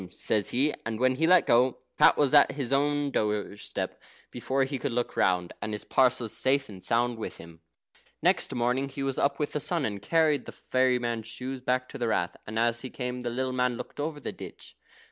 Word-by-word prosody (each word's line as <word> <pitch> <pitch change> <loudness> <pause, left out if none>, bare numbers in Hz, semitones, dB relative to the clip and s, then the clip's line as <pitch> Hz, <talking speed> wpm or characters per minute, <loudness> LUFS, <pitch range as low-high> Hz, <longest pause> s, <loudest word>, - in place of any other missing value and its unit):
says 100 +2 0
he, 140 +5 +1
and 110 -1 -4
when 130 +1 +3
he 160 +5 +1
let 180 0 +6
go, 125 +2 +3 0.2
Pat - - +6
was 145 -2 +2
at 145 -1 +6
his 140 -2 -3
own 145 0 +1
doorstep 105 -2 -3 0.3
before 130 +3 -1
he 135 0 -3
could 140 - -2
look 120 +1 -2
round, 90 -1 +1
and 110 - -3
his 105 - -4
parcels 125 -3 +1
safe 135 0 +1
and 95 -3 -11
sound 120 0 +1
with - - -5
him. 80 0 -13 0.6
Next - - +1
morning 125 +3 0
he 135 - -5
was 135 -1 -1
up 140 0 +1
with 150 - -2
the 150 - -2
sun, 165 -2 +2
and 100 -2 -4
carried 155 +2 +2
the - - -8
fairy 130 -1 +1
man's 120 -2 -3
shoes 130 +3 -6
back 130 0 0
to - - -8
the 120 - 0
Rath. 90 -5 0
As 115 +2 0
he 130 - -6
came 125 -1 -4
up, - - -8
the - - 0
little 130 +2 -2
man 125 -1 0
looked - - -9
over 150 0 -3
the 130 - -5
ditch. - - -11
125 Hz, 220 wpm, -28 LUFS, 115-140 Hz, 0.6 s, let